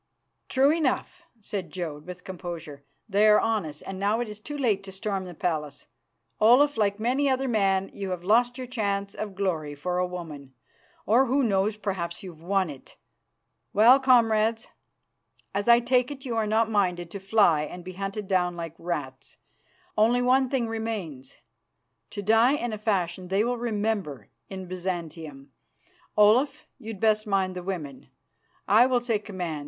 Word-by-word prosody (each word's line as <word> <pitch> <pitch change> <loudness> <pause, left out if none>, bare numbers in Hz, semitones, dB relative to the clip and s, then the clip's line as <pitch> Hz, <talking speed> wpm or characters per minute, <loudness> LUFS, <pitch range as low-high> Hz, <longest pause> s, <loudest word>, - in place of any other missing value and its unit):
"True 270 +2 +4
enough," 330 +3 -1 0.2
said 200 -3 -5
Jodd, 160 -4 -6
with 180 0 -9
composure. 170 -6 -7 0.2
"They 210 +1 +3
are 210 0 +6
on 220 -6 0
us, 150 0 -10
and 195 -1 -7
now 205 +3 +1
it 240 - -2
is 210 0 -8
too 290 +7 -7
late 220 -8 +1
to 195 - -9
storm 195 -1 -3
the 180 -2 -9
palace. 150 -4 -3 0.5
Olaf, 260 +7 +5
like 205 -1 0
many 255 +6 +1
another 265 0 +1
man, 195 -4 +1
you 195 -1 -5
have 180 -2 -4
lost 240 +5 +3
your 255 - -5
chance 200 -5 -2
of 205 -3 -6
glory 165 -7 -2
for 180 +5 -2
a 180 - +1
woman, 150 -7 -8 0.5
or, 250 +5 +4
who 270 +3 +2
knows, 205 -1 +1
perhaps 190 -3 -4
you've 170 -4 -10
won 190 +2 +1
it. 140 -4 -11 0.8
Well, 235 +6 +7
comrades, 225 -3 +3 0.8
as 200 +2 -2
I 235 0 +7
take 250 +1 +2
it 280 -1 -8
you 240 -3 -3
are 220 -1 0
not 220 +1 +2
minded 180 -5 0
to 200 - -6
fly 195 -6 +3
and 175 +4 -7
be 185 +1 -8
hunted 195 +2 -5
down 180 -2 +1
like 165 -2 -6
rats, 145 -7 -5 0.6
only 235 +3 +3
one 260 +1 +3
thing 250 -4 0
remains 210 - -5 0.7
to 205 - -6
die 225 +5 +4
in 240 -6 -2
a 215 - -5
fashion 185 -4 -1
they 195 +3 +1
will 245 +2 0
remember 205 - -2 0.2
in 190 -1 -6
Byzantium. 165 -6 -6 0.7
Olaf, 265 +9 +4
you'd 220 -4 -8
best 215 0 +2
mind 190 -2 0
the 180 - -4
women; 165 -8 -6 0.6
I 225 +5 +6
will 255 -1 +2
take 230 -4 -1
command. 180 -7 -4
200 Hz, 170 wpm, -26 LUFS, 180-230 Hz, 0.8 s, Well